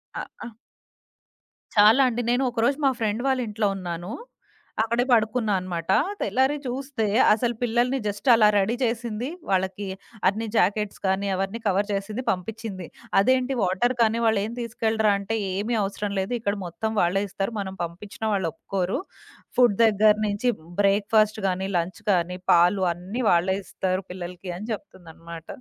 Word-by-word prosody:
అ - - -3 0.2
ఆ! - - -6 1.3
చాలా 215 +5 +7
అండి. 240 0 -2
నేను 255 +2 +2
ఒకరోజు 240 +4 +1
మా - - +4
ఫ్రెండ్ 220 +1 0
వాళ్ళింట్లో 230 -5 0
ఉన్నాను, 175 0 -5 0.7
అక్కడే 235 +2 +1
పడుకున్నా 220 -1 +2
అనమాట. 180 -1 -3 0.3
తెల్లారి 265 +3 +1
చూస్తే 255 -2 -3 0.3
అసలు 235 +2 0
పిల్లలిని 245 +2 +1
జస్ట్ 205 +4 -5
అలా 220 -2 +6
రెడీ 200 +4 +1
చేసింది, 235 +1 -2 0.2
వాళ్ళకి 190 +1 0 0.4
అన్ని 215 +4 0
జాకెట్స్ 210 +1 +1
కానీ, 190 +1 0
అవన్నీ 195 +4 -3
కవర్ 200 +1 +1
చేసింది 210 +5 -3
పంపించింది. 195 -1 -5 0.3
అదేంటి 255 +5 +2
వాటర్ 195 +7 +1
కానీ 225 0 +3
వాళ్ళేం 220 -1 +1
తీసుకెళ్ళరా? 220 -2 +1
అంటే, 220 +3 -2 0.2
"ఏమీ 215 +5 -1
అవసరం 200 +1 -3
లేదు, 190 +6 -2
ఇక్కడ 205 -2 -1
మొత్తం 220 +6 -3
వాళ్ళే 185 +3 +1
ఇస్తారు. 195 +5 -3
మనం 190 -1 -4
పంపించిన 175 +6 -8
వాళ్ళొప్పుకోరు. 185 +1 -2 0.6
ఫుడ్ 240 -5 +5
దగ్గర 215 0 +5
నుంచి 205 +5 0 0.3
బ్రేక్‌ఫాస్ట్ 210 +2 +2
గానీ, 190 +1 -1
లంచ్ 175 +5 -3
కానీ, 180 -1 0
పాలు 180 +3 +4
అన్నీ 190 +9 -5
వాళ్ళే 175 +2 +3
ఇస్తారు 185 0 -2
పిల్లలికి" 180 0 -7
అని 210 +4 -7
జెప్తుందనమాట. 165 -4 -10
205 Hz, 140 wpm, -25 LUFS, 190-230 Hz, 1.3 s, చాలా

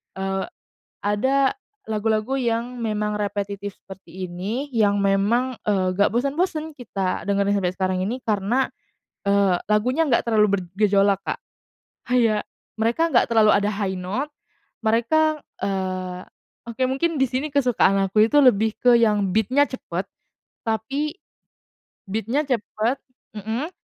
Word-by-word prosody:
eee, 195 0 -2 0.6
ada 260 +7 +2 0.3
lagu-lagu 220 +2 0
yang 240 -1 -1
memang 210 -1 -1
repetitif 205 -1 -3
seperti 190 -1 -9
ini 210 +11 -4
yang 205 -3 +3
memang, 205 +6 +2
eee, 190 -3 +1
gak 200 +2 +3
bosen-bosen 310 - -1
kita 200 -8 -3
dengerin 200 0 +2
sampai 185 -3 0
sekarang 185 0 -1
ini 230 +6 -2
karena, 220 +4 +1 0.6
eee, 200 -2 +3 0.2
lagunya 250 +9 +2
gak 235 - +2
terlalu 210 -3 +3
bergejolak, 195 +2 +2
Kak. - - -3 0.7
Kayak 230 -4 +2 0.3
mereka 235 +9 +2
gak 260 - +4
terlalu 220 -2 +5
ada 205 +1 +1
high 195 -2 -2
note 210 +11 -3 0.5
mereka 300 +8 +2 0.2
eee, 185 -2 -3 0.5
oke 235 +3 -4
mungkin 295 +5 0
disini 265 +3 0
kesukaan 245 -8 +3
aku 215 +3 +3
itu 295 - +4
lebih 220 -3 +3
ke 245 -1 +5
yang 210 -5 +2
beat-nya 255 +7 +3
cepet 190 -8 -5 0.6
tapi 270 - -2 0.9
beat-nya 225 +8 -1
cepet 235 0 -1 0.4
mhm. 225 - -3
215 Hz, 125 wpm, -23 LUFS, 200-255 Hz, 0.9 s, terlalu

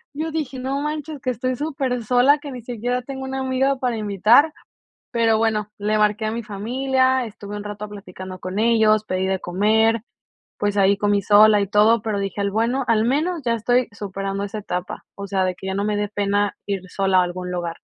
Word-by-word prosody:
Yo 315 +2 -3
dije, 275 -5 -3
no 270 +2 -2
manches, 300 -1 -4
que 255 -3 -1
estoy 255 +2 -2
supersola, 265 -2 +2
que 290 0 -8
ni 245 -2 -7
siquiera 245 +1 -2
tengo 265 +1 -7
una 265 0 -4
amiga 265 +1 +1
para 245 -3 -1
invitar, 215 - +4 0.6
pero 225 -2 +3
bueno, 215 -2 0
le 210 +1 0
marqué 210 +1 +2
a 215 - -1
mi 235 +1 -3
familia, 260 +5 0
estuve 205 -1 -8
un 205 - -5
rato 210 0 -6
platicando 185 -2 -9
con 185 +2 -4
ellos, 220 -2 +3
pedí 185 -1 -1
de 190 - 0
comer, 220 +5 +2 0.6
pues 205 0 0
ahí 200 0 +4
comí 205 -1 +1
sola 210 0 +6
y - - +1
todo, 215 +3 +4
pero 210 -2 -1
dije 195 0 -4
al 200 - 0
bueno 235 +5 0
al 220 -1 +3
menos 315 +6 0
ya 235 - +2
estoy 245 +2 +1
superando 195 0 -4
esa 210 +2 -5
etapa, 180 -3 -5
o 200 - -6
sea, 190 -1 0
de 185 -1 -1
que 190 - -11
ya 190 - -2
no 200 +1 -1
me 210 -1 0
de 205 0 -1
pena 205 0 0
ir 195 -2 -2
sola 190 -1 +1
a - - +4
algún 180 0 -5
lugar. 175 -2 -3
215 Hz, 210 wpm, -22 LUFS, 200-255 Hz, 0.6 s, sola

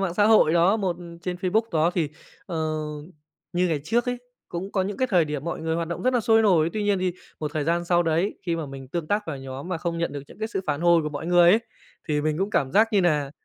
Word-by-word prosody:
mạng 185 -3 -1
xã 205 - +3
hội 215 -8 +5
đó, 175 +5 +4
một 190 -5 -1 0.3
trên 180 0 -3
Facebook 185 +5 +1
đó, 160 +1 +3
thì, 165 -5 0 0.4
ờ, 170 -4 -4 1.0
như 180 0 +1
ngày 155 -3 0
trước 235 +8 +1
ấy, 245 0 -1 0.3
cũng 185 +3 -5
có 190 - +1
những 195 +1 -4
cái 260 - +1
thời 180 -5 +4
điểm 150 -2 -4
mọi 170 - -3
người 160 0 -1
hoạt 165 -1 -2
động 170 - -4
rất 255 +1 +2
là 245 - +3
sôi 225 0 +4
nổi. 170 -6 +3
Tuy 215 - -2
nhiên 205 -1 +2
thì 185 -1 0 0.3
một 150 -1 -2
thời 155 -2 0
gian 170 +2 0
sau 175 0 +3
đấy, 165 +4 0
khi 170 -3 -1
mà 160 -2 -4
mình 135 -1 -9
tương 165 +2 -3
tác 205 +4 0
vào 155 - -4
nhóm 135 +4 -7
mà 185 - -1
không 170 +1 -3
nhận 165 -5 -1
được 145 - -5
những - - -15
cái 220 0 -3
sự 205 - -2
phản 145 -1 -1
hồi 170 -1 +4
của 150 - -2
mọi 150 +2 -6
người 175 0 +6
ấy, 215 +5 +5 0.5
thì 150 -1 +1
mình 155 +1 -1
cũng 195 +2 -1
cảm 135 -9 0
giác 220 +3 +5
như 205 - +4
nà 150 -6 +1
175 Hz, 280 wpm, -25 LUFS, 155-195 Hz, 1.0 s, người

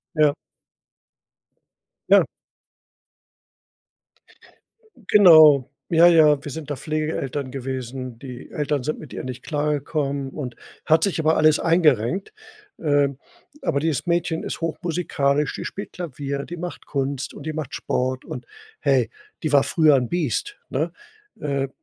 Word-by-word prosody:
Ja. 150 -2 +4 1.7
Ja. - - +6 2.9
Genau, 155 -9 +8 0.2
ja, 170 +1 +6
ja, 155 -4 +5
wir 145 - -6
sind 150 0 -7
da 145 - -2
Pflegeeltern 150 -3 -3
gewesen, 130 -2 -5
die 125 -2 -10
Eltern 145 -2 -1
sind 155 - -2
mit 150 - -11
ihr - - -6
nicht 125 -1 -6
klargekommen 145 -2 -2
und 125 -4 -6 0.3
hat 160 +4 +4
sich 195 -4 0
aber 160 +1 +3
alles 155 -1 +5
eingerenkt, 165 - +2 0.5
ähm, 145 -3 +1 0.4
aber 140 - 0
dieses 155 0 -1
Mädchen 170 -1 0
ist - - -5
hochmusikalisch, 155 -4 -1
die - - -5
spielt 200 - -6
Klavier, 140 -4 -5
die 175 - -7
macht 175 +1 -7
Kunst 140 -1 -3
und 140 - -10
die 155 - -3
macht 155 -4 -5
Sport 130 0 -2
und, - - -7 0.3
hey, - - +2 0.3
die 155 -3 -1
war 140 -1 +6
früher 155 -3 +4
'n 125 -2 -1
Biest, 175 - -2
ne? - - -1 0.5
Äh, 140 -2 -1
150 Hz, 130 wpm, -23 LUFS, 135-160 Hz, 2.9 s, Genau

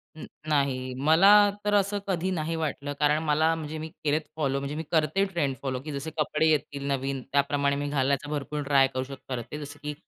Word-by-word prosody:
अ, 155 - -10 0.3
नाही. 135 -4 0
मला 160 +8 +5 0.4
तर 205 - +1
असं 205 0 +2
कधी 185 0 -1
नाही 165 -1 -2
वाटलं, 145 -2 -3
कारण 150 +1 +3
मला 155 +2 +2
म्हणजे 155 -1 -5
मी 160 +1 -5 0.2
केलेत 150 +1 +1
फॉलो, 140 -3 0
म्हणजे 140 +1 -4
मी 160 - -3
करते 160 +4 +2
ट्रेंड 170 -9 -1
फॉलो, 130 -2 -2
की 150 - -7
जसे 145 +3 -5
कपडे 155 +1 +1
येतील 140 -2 -1
नवीन 135 -1 -1
त्याप्रमाणे 140 0 +2
मी 145 0 -2
घालण्याचा 140 0 0
भरपूर 150 0 -3
ट्राय 140 -1 +4
करू 130 0 -1
शकते 135 0 -7
जसं, 145 0 -9
की 150 0 -3
145 Hz, 195 wpm, -27 LUFS, 140-160 Hz, 0.4 s, मला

